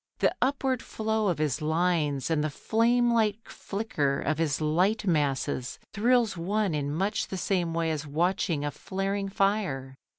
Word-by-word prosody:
The - - +2
upward 265 -2 +1
flow 220 -1 -1
of 175 - +1
his 155 0 -1
lines 155 -3 +1
and 155 -2 +2
the 155 - 0
flame 235 +8 +2
like 220 -1 +1
flicker 150 -10 -2
of 155 +1 -1
his 150 -4 +1
light 180 +8 +1
masses 140 -6 0 0.2
thrills 235 0 +3
one 195 +2 0
in 145 -1 -1
much 195 +7 -1
the 190 - -5
same 175 -3 0
way 165 -1 +1
as 155 -1 -3
watching 165 0 0
a 145 - -1
flaring 195 +5 -3
fire. 195 -10 0
180 Hz, 160 wpm, -28 LUFS, 150-210 Hz, 0.2 s, thrills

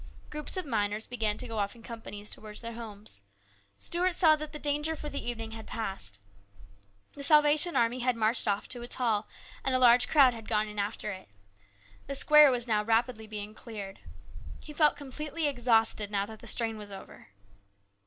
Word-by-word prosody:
Groups 300 +5 -3
of 370 - -2
miners 210 -4 -1
began 220 -4 -1
to - - -4
go 225 -2 -4
off 200 +1 -2
in 230 - -16
companies 215 -3 -8
towards 210 -1 -6
their 230 0 -6
homes. 215 - -9 0.6
Stuart 350 - 0
saw 320 -4 +6
that 305 0 -7
the - - -6
danger 295 +2 -1
for 300 -1 -6
the 280 - -5
evening 225 -2 -5
was 225 - -8
passed. 195 - -4 0.9
The 285 - -9
Salvation 300 +3 +5
Army 235 +2 +1
had 250 0 +1
marched 225 +1 +2
off 205 +1 0
to 245 - -4
its 240 - -3
hall, 220 -4 0 0.4
and 265 - 0
a - - +4
large 245 -1 +5
crowd 275 -5 +5
had 225 -2 -10
gone 215 -1 +1
in 210 0 -6
after 210 +1 -3
it. 185 - -10 0.8
The 275 - -3
square 300 +1 +7
was 245 -2 +1
now 210 -2 +1
rapidly 225 0 0
being 210 0 -6
cleared. 205 -4 -9 0.6
He 300 - -10
felt 300 -1 +3
com 285 -2 -10
pletely 300 +2 -1
exhausted, 225 -5 +2
now 200 -1 -1
that 220 +1 -11
the 235 - -12
strain 225 -1 +1
was 205 -1 -8
over. 195 - -12
230 Hz, 195 wpm, -29 LUFS, 215-280 Hz, 0.9 s, square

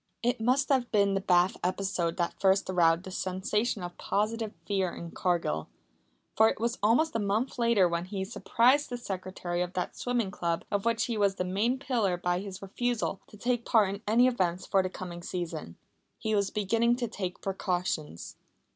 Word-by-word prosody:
It 240 -1 +1
must 255 +4 +2
have 260 -4 +2
been 200 -1 +3
the 195 - 0
bath 180 +2 +3
episode 180 -2 -1
that 170 -1 0
first 190 0 +3
aroused 170 -1 +3
the 190 - -8
sensation 190 +3 -1
of 175 0 -7
positive 220 +1 -1
fear 190 -3 0
in 170 -1 -7
Cargill. 170 - -1 0.7
For 220 0 +6
it - - -4
was 235 +2 -1
almost 235 +10 +3
a - - +2
month 215 +6 -1
later 230 -6 +4
when 170 0 -2
he 190 0 -4
surprised 250 +5 +2
the 245 - -3
secretary 185 -5 -4
of 180 +1 -2
that 180 - -3
swimming 240 -5 -1
club 170 -4 -2
of 205 0 0
which 230 -1 +2
he 230 -3 -2
was 200 -1 +3
the 180 - -2
main 210 +8 +1
pillar 230 -9 0
by 175 0 0
his 195 0 -7
refusal 230 0 -2
to 210 - -14
take 240 +2 0
part 215 -5 +4
in 200 - -7
any 230 +4 +5
events 185 -8 0
for 195 - +3
the 185 - -2
coming 175 -2 -7
season. 170 - -5 0.4
He 220 - -2
was 200 -2 +2
beginning 230 +4 +2
to 240 -1 -2
take 190 -5 -5
precautions. 175 - -3
195 Hz, 190 wpm, -29 LUFS, 180-230 Hz, 0.7 s, For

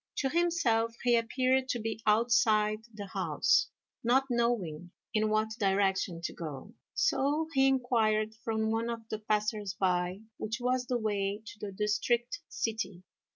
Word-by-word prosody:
To 270 - +1
himself 265 -9 +1
he 240 -1 +4
appeared 255 +3 +1
to 240 - 0
be 220 0 -4
outside 215 -1 +3
the 210 -2 -7
house, 195 - +2 0.4
not 250 +3 +4
knowing 200 -9 0 0.2
in 215 0 +2
what 215 0 +1
direction 190 -3 +1
to - - -3
go, 150 -6 -7 0.2
so 295 +4 +1
he 270 -1 +4
inquired 225 -5 +2
from 220 -1 0
one 225 +1 0
of 230 -1 -5
the 215 - -3
passers 210 -2 -1
by 180 +1 +1 0.2
which 220 +2 -3
was 250 0 0
the 250 - +1
way 205 -1 -1
to 210 - -10
the 205 -1 -5
district 215 - 0
city. 205 -5 -3
220 Hz, 150 wpm, -31 LUFS, 205-240 Hz, 0.4 s, he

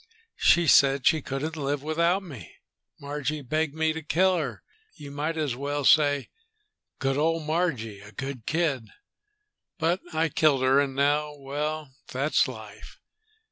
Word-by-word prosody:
She 175 0 +5
said 140 -3 +5
she 160 - +4
couldn't 140 +5 -4
live 145 -2 -2
without 170 +5 +1
me. 130 - -11 0.4
Margie 145 +1 -4
begged 155 +3 -1
me 160 0 +1
to 160 - -5
kill 185 +5 +2
her, 135 -9 -4 0.3
you 145 -5 -10
might 150 +3 -3
as 150 -6 -1
well 145 +2 -3
say. 145 -2 +4 0.7
Good 135 +1 -1
old 165 +1 +1
Margie; 150 - -1
a 100 +1 -13
good 130 +1 -6
kid, 150 -8 0 0.9
but 170 +1 +1
I 160 0 +1
killed 140 -3 +2
her. 130 +1 +4
And 140 -2 0
now.... 145 +2 +1
Well, 145 +1 -4 0.2
that's 140 +4 +2
life!" - - -10
145 Hz, 145 wpm, -26 LUFS, 135-160 Hz, 0.9 s, She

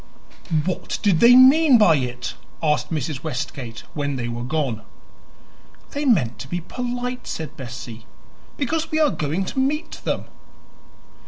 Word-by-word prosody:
"What 185 - -2
did 195 -6 +3
they 240 +1 +8
mean 265 +2 +7
by 180 -8 +5
it?" 125 -2 -3 0.3
asked 150 -5 +1
Mrs. 150 -2 -2
Westgate, 125 -2 -5
when 145 -2 -2
they 120 -2 -3
were 120 0 -4
gone. 130 -4 -2 1.1
"They 290 +1 -3
meant 150 - +2
to 135 - -7
be 175 +6 -2
polite," 245 +5 -4
said 155 -1 -5
Bessie, 120 -3 -8 0.5
"because 315 +3 -1
we 310 - 0
are 300 -3 +4
going 155 +6 -2
to 265 - -3
meet 295 +5 -1
them." - - -2
160 Hz, 145 wpm, -22 LUFS, -, 1.1 s, they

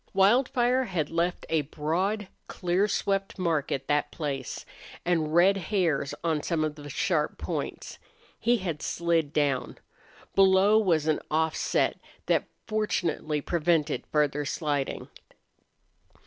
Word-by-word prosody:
Wildfire 245 +5 +3
had 175 -8 -2
left 170 +2 -1
a 160 -1 +2
broad, 175 +8 -2 0.2
clear 180 +3 0
swept 195 -1 -1
mark 165 -6 0
at 135 0 -2
that 145 0 +1
place, 140 -5 -4 0.4
and 165 -3 +1
red 185 +3 +6
hairs 160 -7 0
on 160 -3 +1
some 165 -1 0
of 155 -1 -1
the 145 -1 -10
sharp 150 +1 0
points. - - -5 0.4
He 240 +2 +3
had 175 -7 -4
slid 165 -3 0
down. 140 -4 0 0.6
Below 195 +2 +5
was 170 -8 +2
an 155 -1 +2
offset 160 +1 +1 0.3
that - - +1 0.2
fortunately 170 -8 -1
prevented 165 -1 +1
further 150 -1 +1
sliding. 145 -1 -2
165 Hz, 120 wpm, -27 LUFS, 150-195 Hz, 0.6 s, red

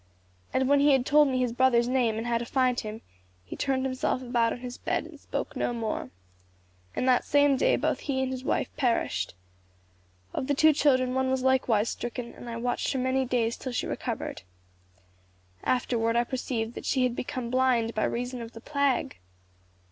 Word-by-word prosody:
And 260 0 +1
when 285 +1 +4
he 285 0 +5
had 260 -2 +2
told 300 +1 +5
me 260 -1 0
his 250 -2 0
brother's 240 -1 +3
name 245 -4 +1
and 225 - -3
how 235 -1 +1
to - - -3
find 255 -1 +2
him, 215 0 -6 0.4
he - - -7
turned 265 -1 0
himself 255 0 -1
about 240 -2 +1
on 240 - -5
his 250 -1 -6
bed 345 0 -2
and 320 -3 -12
spoke - - -4
no - - -1
more. 225 -2 -3 0.9
In - - -1
that 255 -1 +4
same 285 -1 +4
day - - +3
both - - 0
he 265 -2 -1
and 260 - -2
his 260 -1 -5
wife - - -1
perished. 245 - 0 1.0
Of 260 - -2
the 285 - +1
two 315 +2 +6
children 255 -3 +2
one 260 0 +1
was 260 -1 0
likewise 250 -5 +2
stricken, 240 0 -5
and 240 - -10
I 230 - -4
watched 245 +1 -1
her 265 - -1
many 260 +1 +1
days 235 -2 0
till 255 - -5
she - - -1
recovered. - - -4 1.2
Afterward 230 -2 +1
I 240 - +4
perceived 240 -3 -3
that - - -8
she 260 - +2
had 250 -1 +1
become 245 -1 -4
blind 250 -3 +2
by 215 - 0
reason 245 +1 -3
of 230 0 -8
the 225 - -9
plague. 280 - 0
255 Hz, 195 wpm, -28 LUFS, 235-265 Hz, 1.2 s, two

